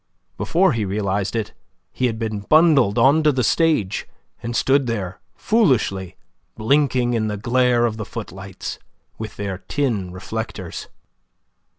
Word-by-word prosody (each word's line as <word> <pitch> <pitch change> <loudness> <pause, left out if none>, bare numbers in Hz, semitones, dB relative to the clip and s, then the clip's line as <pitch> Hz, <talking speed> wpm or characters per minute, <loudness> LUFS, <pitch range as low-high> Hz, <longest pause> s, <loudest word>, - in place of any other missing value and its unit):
Before 185 +3 +2
he 115 -2 -1
realized 100 +1 -1
it, 110 -2 -2 0.4
he 130 - 0
had 115 -2 -3
been 110 -2 -3
bundled 140 -2 +4
on 145 +4 +5
to 155 -1 +4
the 130 -2 0
stage, 155 - +1 0.3
and 120 0 -4
stood 135 +1 +2
there 95 -6 -3 0.2
foolishly, 110 - +1 0.4
blinking 125 0 +2
in 110 -2 0
the 105 -1 -3
glare 120 +2 +2
of 110 -2 -2
the 110 - -4
footlights, - - -7 0.4
with 110 -1 -6
their 95 -2 -4
tin 100 -2 -2
reflectors. 95 -1 -6
115 Hz, 135 wpm, -21 LUFS, 100-135 Hz, 0.4 s, on